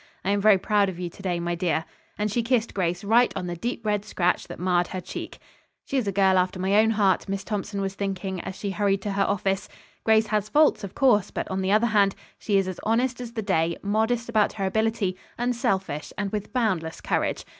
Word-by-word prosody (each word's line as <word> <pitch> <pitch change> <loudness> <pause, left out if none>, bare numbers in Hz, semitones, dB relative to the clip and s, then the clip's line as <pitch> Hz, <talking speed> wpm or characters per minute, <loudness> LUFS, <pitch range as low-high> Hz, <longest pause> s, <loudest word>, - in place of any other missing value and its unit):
I 195 - +2
am 200 0 +1
very 210 -1 +6
proud 200 +1 +2
of 180 - -7
you 175 -1 -4
to 195 - -14
day, 180 -3 -1
my 175 0 -2
dear," 170 -2 0 0.3
and 210 0 -1
she 235 - +1
kissed 230 -1 0
Grace 180 0 -1
right 230 +4 +4
on 180 - -3
the 175 -1 -4
deep, 230 +5 -4
red 210 -1 0
scratch 180 -3 0
that - - -8
marred 175 -1 +1
her 185 - -5
cheek. - - -7 0.5
"She - - -4
is 250 -6 +1
a - - +1
girl 190 -1 +4
after 185 +1 -1
my 190 +2 0
own 220 +1 +5
heart," 205 -3 +2
Miss 195 0 -2
Thompson 205 -1 -3
was 195 -1 -2
thinking, 195 -2 -3
as 190 0 -6
she 200 0 -4
hurried 195 -1 0
to 205 - -2
her 195 0 0
office. 195 -1 -1 0.3
"Grace 220 0 +4
has 210 -1 -1
faults, 300 -4 +4
of 195 - -7
course, 230 -8 +3
but - - -4
on 190 0 -1
the 190 +1 0
other 215 +3 +4
hand, 205 -4 +3 0.2
she 205 -2 +1
is 195 -1 +1
as 185 -2 -5
honest 245 +3 0
as 235 -1 -7
the 220 -2 -3
day, 170 -4 +1
modest 220 +3 0
about 215 -3 +2
her 195 -2 -2
ability, 220 -2 0 0.2
unselfish 195 -11 -1
and 205 -1 -2
with 210 -1 -4
boundless 185 -10 -1
courage. - - -1
200 Hz, 230 wpm, -25 LUFS, 185-220 Hz, 0.5 s, very